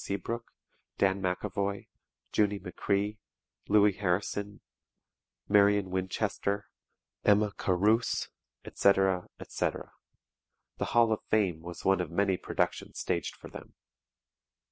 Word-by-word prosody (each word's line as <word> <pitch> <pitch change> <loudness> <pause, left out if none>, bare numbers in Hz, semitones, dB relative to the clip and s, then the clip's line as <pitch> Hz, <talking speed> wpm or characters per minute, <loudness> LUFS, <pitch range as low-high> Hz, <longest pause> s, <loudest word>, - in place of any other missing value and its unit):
Seabrooke, 115 +4 -4 0.5
Dan 95 0 +2
McAvoy, 100 +2 -2 0.5
Junie 105 -1 +2
McCree, 100 +3 -2 0.5
Louis 105 0 +5
Harrison, 100 +1 -2 0.9
Marion 100 -2 +4
Winchester, 100 +2 -1 0.6
Emma 105 0 +4
Carus, 105 +6 +1 0.4
etc., 95 -2 +2
etc. - - -3 0.9
"The - - 0
Hall 115 -1 +3
of 110 - -2
Fame" 95 -7 +1
was 85 +1 -9
one 95 -1 +4
of 90 - -4
many 95 +3 +1
productions - - -2
staged - - -2
for - - -12
them. - - -11
100 Hz, 100 wpm, -30 LUFS, 95-105 Hz, 0.9 s, Louis